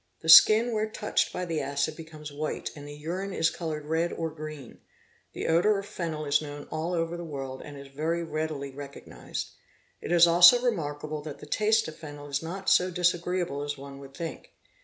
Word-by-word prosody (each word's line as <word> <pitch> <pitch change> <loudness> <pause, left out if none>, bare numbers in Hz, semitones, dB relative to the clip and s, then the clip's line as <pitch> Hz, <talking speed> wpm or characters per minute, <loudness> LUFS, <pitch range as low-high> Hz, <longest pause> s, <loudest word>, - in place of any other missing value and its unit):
The 160 - -4
skin 220 +8 +9
where 215 0 -1
touched 210 -1 0
by 180 - -3
the 165 -3 -2
acid 140 +2 -1
becomes 155 -2 -10
white 150 +1 -4
and 145 -1 -10
the 145 - -8
urine 180 +6 -4
is 165 -2 +2
coloured 155 -3 -5
red 160 +2 0
or 165 -1 -3
green. 155 -4 -9 0.5
The - - -5
odour 180 +6 +3
of 195 - -5
phenyl 160 -6 -4
is 145 +1 +3
known 145 -1 -8
all 165 +3 -2
over 165 0 -1
the 175 - -6
world 135 -4 -6
and 145 -1 -10
is 140 - -10
very 160 +5 -2
readily 155 -3 -4
recognised. 140 +1 -7 0.5
It - - -5
is 170 -1 +7
also 175 +7 +8
remarkable 155 -10 -2
that 145 -1 -8
the - - -11
taste 215 +7 +2
of 160 0 -9
phenyl] 145 -2 -9
is 140 - 0
not 190 +4 -6
so 180 +1 +4
disagreeable 175 -3 0
as 145 0 -4
one 140 0 -10
would 135 0 -12
think. 165 -2 -6
160 Hz, 200 wpm, -28 LUFS, 145-175 Hz, 0.5 s, skin